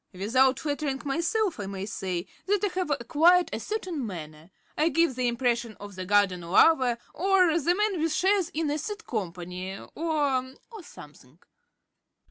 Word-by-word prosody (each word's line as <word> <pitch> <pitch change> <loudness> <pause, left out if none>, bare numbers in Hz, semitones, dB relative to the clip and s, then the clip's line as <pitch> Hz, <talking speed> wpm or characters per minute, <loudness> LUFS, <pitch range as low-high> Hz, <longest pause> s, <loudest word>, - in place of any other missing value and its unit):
Without 250 +7 +2
flattering 285 -2 -2
myself 335 - 0
I 200 - -4
may 195 0 -5
say 185 -3 -4 0.2
that 410 +1 +1
I 410 - +2
have 365 -2 -3
acquired 320 +7 +3
a - - -2
certain 370 -9 -4
manner; 160 -5 -8 0.3
I 315 +2 +2
give 330 -2 +2
the 250 0 -1
impression 235 -2 -1
of 205 0 -9
the 185 -1 -7
garden 200 -3 +3
lover, 245 - +4 0.2
or 365 -2 +3
the 345 +4 +2
man 415 -4 0
with 325 0 +1
shares 380 +1 +2
in 310 -2 -2
a 300 - -1
seed 415 +7 -6
company, 180 -2 -5
or 280 -5 -2
or 445 -3 -9
something. 145 - -15
270 Hz, 160 wpm, -27 LUFS, -, 0.3 s, lover